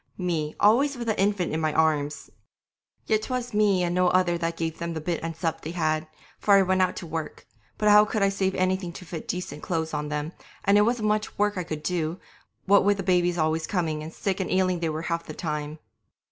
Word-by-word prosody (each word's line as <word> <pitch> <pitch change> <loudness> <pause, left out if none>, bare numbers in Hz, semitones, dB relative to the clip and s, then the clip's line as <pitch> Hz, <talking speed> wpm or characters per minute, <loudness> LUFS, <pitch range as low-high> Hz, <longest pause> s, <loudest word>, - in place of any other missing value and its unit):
Me 165 -5 -2
always 260 +7 +4
with 235 -1 -5
an 220 - +1
infant 195 -3 +1
in 160 - -1
my 155 -1 +1
arms! 150 -2 0 0.7
Yet 215 -1 +2
'twas 250 0 -4
me 205 -3 +3
and 175 0 0
no 180 0 +3
other 180 -1 +3
that 165 -1 -2
gave 160 -1 -3
them 170 0 -4
the - - -2
bit 165 +2 -2
and 165 0 -4
sup 160 0 -2
they 155 - -6
had, 155 -2 0 0.3
for 200 - +5
I 195 - +6
went 190 0 +2
out 185 - +1
to - - -6
work; 160 -1 -5 0.3
but 210 - 0
how 210 0 +7
could 210 -1 -1
I 195 - +4
save 195 -1 -1
anything 185 -1 0
to 180 - -10
fit 165 -1 -7
decent 165 -5 -4
clothes 160 -2 -2
on 150 0 -2
them, 150 +1 -3 0.3
and 200 - +4
it 210 - +5
wasn't 230 -2 +1
much 215 0 -1
work 205 0 +1
I 180 - -2
could 155 -3 -6
do, 170 -1 -2 0.5
what 200 +1 +5
with 205 0 +3
the 195 - -3
babies 175 -1 +2
always 160 0 0
coming, 160 -5 -1
and 155 +1 -7
sick 195 +2 -2
and 190 - -2
ailing 185 -1 +1
they 165 -1 -1
were 155 +1 -4
half 170 -1 -2
the - - -8
time. 150 -2 -4
175 Hz, 235 wpm, -26 LUFS, 160-195 Hz, 0.7 s, how